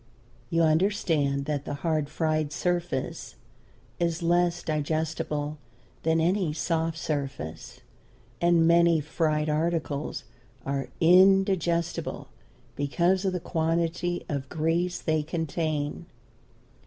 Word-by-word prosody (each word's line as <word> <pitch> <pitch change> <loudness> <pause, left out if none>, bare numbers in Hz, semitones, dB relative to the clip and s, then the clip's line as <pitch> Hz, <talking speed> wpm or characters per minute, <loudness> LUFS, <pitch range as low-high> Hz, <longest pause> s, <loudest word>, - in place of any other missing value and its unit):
You 165 -1 +2
understand 155 -5 +1
that 145 -1 -2
the 145 - -3
hard 155 -1 -1
fried 155 -1 0
surface 175 -4 -2 0.6
is 170 0 -1
less 175 0 +2
digestible 155 -1 -2 0.4
than 160 0 +2
any 175 -1 +1
soft 165 0 -1
surface, 140 - -5 0.6
and 170 -1 +4
many 170 -1 +5
fried 155 0 0
articles 155 -1 -1 0.4
are 135 0 -2
indigestible 175 -2 +3 0.5
because 175 +7 +1
of 190 - +1
the 180 - -1
quantity 170 +1 -1
of 140 -3 -4
grease 165 +3 0
they 155 -1 0
contain. 155 -2 -3
160 Hz, 100 wpm, -27 LUFS, 150-170 Hz, 0.6 s, many